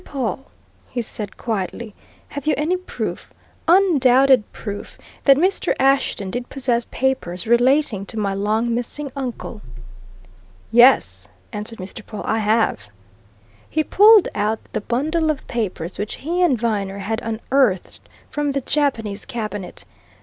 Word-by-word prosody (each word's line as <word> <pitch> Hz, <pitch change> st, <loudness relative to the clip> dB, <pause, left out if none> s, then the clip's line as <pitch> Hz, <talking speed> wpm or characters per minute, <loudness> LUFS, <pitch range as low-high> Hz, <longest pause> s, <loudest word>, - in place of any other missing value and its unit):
Pawle," 265 Hz, -, -4 dB, 0.4 s
he 245 Hz, -2 st, -3 dB
said 210 Hz, -2 st, -6 dB
quietly, 215 Hz, 0 st, -3 dB, 0.4 s
"have 285 Hz, 0 st, -7 dB
you 305 Hz, -, +3 dB
any 310 Hz, +5 st, +1 dB
proof 365 Hz, 0 st, -5 dB, 0.4 s
undoubted 275 Hz, -, +5 dB
proof 205 Hz, -2 st, -7 dB, 0.3 s
that 275 Hz, -1 st, +7 dB
Mr. 375 Hz, +6 st, +1 dB
Ashton 265 Hz, -7 st, +2 dB
did 245 Hz, +2 st, -4 dB
possess 245 Hz, -3 st, 0 dB
papers 250 Hz, -9 st, -1 dB
relating 240 Hz, -3 st, +2 dB
to 225 Hz, -, -7 dB
my 200 Hz, -2 st, 0 dB
long 215 Hz, +4 st, 0 dB
missing 260 Hz, +4 st, -4 dB
uncle?" 245 Hz, -4 st, -5 dB, 1.1 s
"Yes," 240 Hz, +3 st, +5 dB, 0.3 s
answered 215 Hz, +2 st, -6 dB
Mr. 190 Hz, +3 st, -8 dB
Pawle, 210 Hz, 0 st, -7 dB
"I 220 Hz, +1 st, +1 dB
have!" 215 Hz, -, +1 dB, 0.8 s
He 310 Hz, -, +1 dB
pulled 415 Hz, +3 st, +6 dB
out 215 Hz, +2 st, 0 dB, 0.2 s
the 215 Hz, -, -1 dB
bundle 310 Hz, +9 st, 0 dB
of 300 Hz, -3 st, -1 dB
letters 185 Hz, -7 st, -3 dB
which 210 Hz, +1 st, -3 dB
he 340 Hz, +6 st, -2 dB
and 320 Hz, -8 st, +4 dB
Viner 200 Hz, -4 st, -1 dB
had 220 Hz, +3 st, -3 dB
unearthed 225 Hz, -2 st, 0 dB, 0.3 s
from 295 Hz, -1 st, -1 dB
the 275 Hz, -, -1 dB
Japanese 235 Hz, -8 st, -1 dB
cabinet. 210 Hz, -5 st, -6 dB
235 Hz, 135 wpm, -21 LUFS, 210-275 Hz, 1.1 s, that